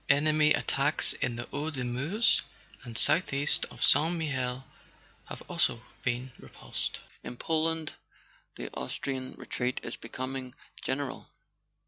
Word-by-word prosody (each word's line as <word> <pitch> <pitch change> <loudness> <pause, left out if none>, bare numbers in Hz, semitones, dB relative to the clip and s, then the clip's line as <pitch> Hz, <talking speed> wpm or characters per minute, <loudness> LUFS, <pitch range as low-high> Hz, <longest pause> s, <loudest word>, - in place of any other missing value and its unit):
Enemy 150 +1 +4
attacks 140 +2 +5
in 120 -2 -2
the 120 0 -5
Hauts 150 +2 -3
de 130 - -3
Meuse 140 - +2 0.4
and 120 -4 -6
southeast 145 -4 +3
of - - -5
Saint 165 +3 +5
Mihiel 130 -5 -2 0.6
have - - -8
also - - +1 0.2
been 125 +1 -2
repulsed. - - -5 0.2
"In 120 - -7
Poland 160 +1 0 0.6
the - - -7
Austrian 130 -2 -4
retreat 125 0 -3
is - - -5
becoming 130 0 -6 0.3
gen¬ 130 - -1
eral. 140 -3 -5
140 Hz, 125 wpm, -29 LUFS, 125-155 Hz, 0.6 s, attacks